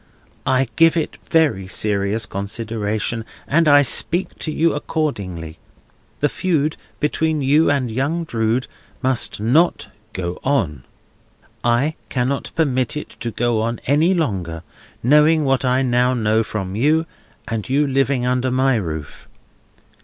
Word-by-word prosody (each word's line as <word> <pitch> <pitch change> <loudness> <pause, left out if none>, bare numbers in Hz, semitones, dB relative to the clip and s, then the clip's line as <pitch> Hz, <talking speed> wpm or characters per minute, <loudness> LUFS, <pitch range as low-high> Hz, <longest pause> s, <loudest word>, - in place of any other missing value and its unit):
I 130 0 +2
give 165 +1 +5
it 160 - -2
very 145 - +2
serious 105 +2 0
consideration, 105 +2 -3 0.2
and 165 +2 +3
I 145 -1 +7
speak 170 +7 +1
to 155 - -3
you 165 +2 +2
accordingly. 100 - -3 0.6
This 145 - +2
feud 155 -4 0 0.2
between 155 0 0
you 150 +4 +4
and 135 -5 0
young 145 +8 -1
Drood 115 -3 0 0.4
must 130 -5 0
not 135 +11 +2 0.2
go 90 -1 -4
on. 95 - 0 0.8
I 120 +6 +2 0.2
cannot 130 +2 -1
permit 130 -5 0
it - - -6
to 120 - -3
go 115 -1 0
on 115 +1 -2
any 155 +7 +3
longer, 90 - -2 0.4
knowing 150 +4 +4
what 135 -1 +1
I 130 +1 +2
now 125 0 +2
know 110 -1 +2
from 95 -3 -4
you, 155 +8 +2 0.4
and 115 +1 -4
you 145 +3 +3
living 135 -2 +1
under 125 +1 +1
my 130 0 +2
roof. 80 -7 -6
130 Hz, 135 wpm, -20 LUFS, 110-150 Hz, 0.8 s, I